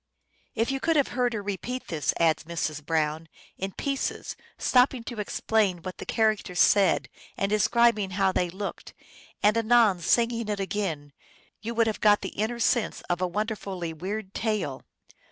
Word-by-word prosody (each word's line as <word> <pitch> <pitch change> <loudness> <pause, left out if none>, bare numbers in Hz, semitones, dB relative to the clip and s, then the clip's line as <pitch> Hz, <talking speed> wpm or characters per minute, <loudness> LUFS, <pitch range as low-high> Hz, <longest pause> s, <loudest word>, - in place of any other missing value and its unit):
"If 230 +3 +1
you 270 - -1
could 325 +3 +1
have 285 -3 +3
heard 245 -1 0
her 210 -2 -3
repeat 220 +6 -4
this," 155 -3 0
adds 160 -2 +2
Mrs. 155 -3 -3
Brown, 160 +1 -1
" - - -27
in 195 +1 -3
pieces, 275 +6 -3 0.2
stop 250 +1 +4
ping 250 -3 -8
to 230 -1 -7
explain 205 -3 0
what 185 -1 -7
the - - -7
characters 215 -5 0
said, 200 -2 +4 0.3
and 195 +1 -1
describing 215 -1 +3
how 195 -1 +3
they 180 -1 0
looked, 195 +3 -7 0.5
and 210 +1 +5
anon 230 -4 +4
singing 230 +5 +1
it 205 -1 -1
again, 190 -8 -3 0.5
you 230 +2 -4
would 230 0 +4
have 220 -1 -2
got 210 -1 +5
the - - -4
inner 220 +4 -2
sense 235 -1 +1
of 175 +1 -1
a 185 - +2
wonderfully 195 -4 -3
weird 190 +4 -5
tale. 210 - -2
205 Hz, 170 wpm, -27 LUFS, 180-230 Hz, 0.5 s, and